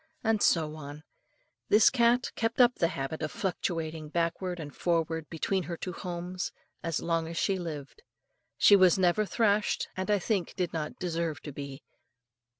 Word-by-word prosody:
And 220 Hz, -2 st, +2 dB
so 155 Hz, -3 st, +3 dB
on; 150 Hz, 0 st, -9 dB, 0.7 s
this 215 Hz, +1 st, +6 dB
cat 240 Hz, 0 st, +3 dB
kept 225 Hz, +2 st, -2 dB
up 245 Hz, 0 st, +7 dB
the 165 Hz, -, +1 dB
habit 140 Hz, +1 st, -4 dB
of 155 Hz, -, -2 dB
fluctuating 165 Hz, -6 st, -3 dB
backwards 170 Hz, +2 st, -1 dB
and 145 Hz, -3 st, -7 dB
forwards, 160 Hz, -2 st, 0 dB
between 185 Hz, +4 st, -1 dB
her 170 Hz, -1 st, -5 dB
two 180 Hz, -, -5 dB
homes, 180 Hz, 0 st, -4 dB, 0.3 s
as 165 Hz, -1 st, -2 dB
long 165 Hz, -1 st, 0 dB
as 165 Hz, 0 st, -6 dB
she 190 Hz, +2 st, +1 dB
lived. 160 Hz, -, -7 dB, 0.6 s
She 205 Hz, -, +7 dB
was 185 Hz, -2 st, +6 dB
never 190 Hz, +3 st, +3 dB
thrashed, 210 Hz, +1 st, +1 dB
and, 185 Hz, +1 st, -3 dB
I 210 Hz, -, +4 dB
think, 195 Hz, -2 st, -1 dB
did 180 Hz, -2 st, -2 dB
not 155 Hz, -2 st, -4 dB
deserve 170 Hz, -4 st, -2 dB
to 145 Hz, -, -6 dB
be. 140 Hz, 0 st, -8 dB
170 Hz, 165 wpm, -29 LUFS, 160-195 Hz, 0.7 s, up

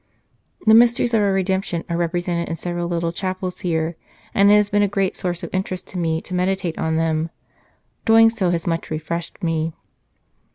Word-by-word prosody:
" -, -, -28 dB
The 220 Hz, -, +6 dB
mysteries 235 Hz, +1 st, +5 dB
of 220 Hz, -, +4 dB
our 200 Hz, -1 st, +2 dB
redemption 190 Hz, -2 st, -1 dB
are 170 Hz, -, -2 dB
repre 175 Hz, +1 st, -1 dB
sented 170 Hz, -1 st, -1 dB
in 165 Hz, -, -3 dB
several 175 Hz, +1 st, -3 dB
little 170 Hz, -1 st, -1 dB
chapels 185 Hz, +1 st, -4 dB
here, 165 Hz, -1 st, -1 dB, 0.4 s
and 200 Hz, 0 st, +5 dB
it 205 Hz, -, +7 dB
has 210 Hz, -1 st, +3 dB
been 205 Hz, +1 st, +3 dB
a 205 Hz, -, +4 dB
great 195 Hz, -1 st, -1 dB
source 175 Hz, -2 st, -3 dB
of -, -, -7 dB
interest 185 Hz, -1 st, -3 dB
to 185 Hz, -, -5 dB
me 160 Hz, -1 st, 0 dB
to -, -, -9 dB
meditate 180 Hz, -1 st, -1 dB
on 160 Hz, 0 st, 0 dB
them; 160 Hz, 0 st, 0 dB, 0.7 s
doing 225 Hz, 0 st, +6 dB
so 205 Hz, -6 st, 0 dB
has 170 Hz, -1 st, -1 dB
much 165 Hz, -1 st, -2 dB
refreshed 165 Hz, +3 st, -5 dB
me." 165 Hz, -1 st, -1 dB
175 Hz, 200 wpm, -21 LUFS, 165-195 Hz, 0.7 s, it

